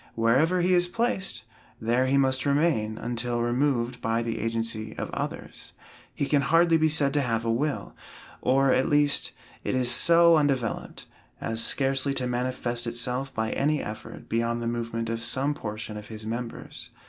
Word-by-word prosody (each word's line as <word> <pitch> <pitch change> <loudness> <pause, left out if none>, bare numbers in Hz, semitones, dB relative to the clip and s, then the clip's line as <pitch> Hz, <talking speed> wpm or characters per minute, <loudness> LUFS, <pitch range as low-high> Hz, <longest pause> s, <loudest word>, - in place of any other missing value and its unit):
Wherever 135 +11 +3
he 180 +1 +2
is 175 0 +3
placed, 190 - -2 0.4
there 120 +3 +1
he 135 +1 +2
must 130 -1 +2
remain 140 -8 +1
until 120 0 -2
removed 125 0 0
by 115 0 0
the 115 -1 -3
agency 115 -1 -3
of - - -4
others. - - -5 0.4
He - - -1
can 140 0 +2
hardly 165 +4 +4
be 160 0 +3
said 145 -3 +2
to 145 - +2
have 115 -3 -1
a 115 - +1
will, 140 +5 -2 0.5
or, 135 +1 +3
at 130 - +2
least, 145 -4 +2 0.3
it - - -1
is 125 -1 +3
so 170 +5 +6
undeveloped, 135 -6 -1 0.3
as 115 0 -2
scarcely 135 0 +1
to 130 - -1
manifest 125 -1 -2
itself 125 +3 -3
by 110 -3 -2
any 150 +2 +1
effort 105 +1 -8
beyond 115 +1 0
the 120 - -4
movement 115 -1 -3
of 115 0 -3
some 135 +5 0
portion 110 -4 -6
of 105 0 -9
his 110 -1 -8
members. 115 +1 -6
125 Hz, 170 wpm, -26 LUFS, 115-145 Hz, 0.5 s, so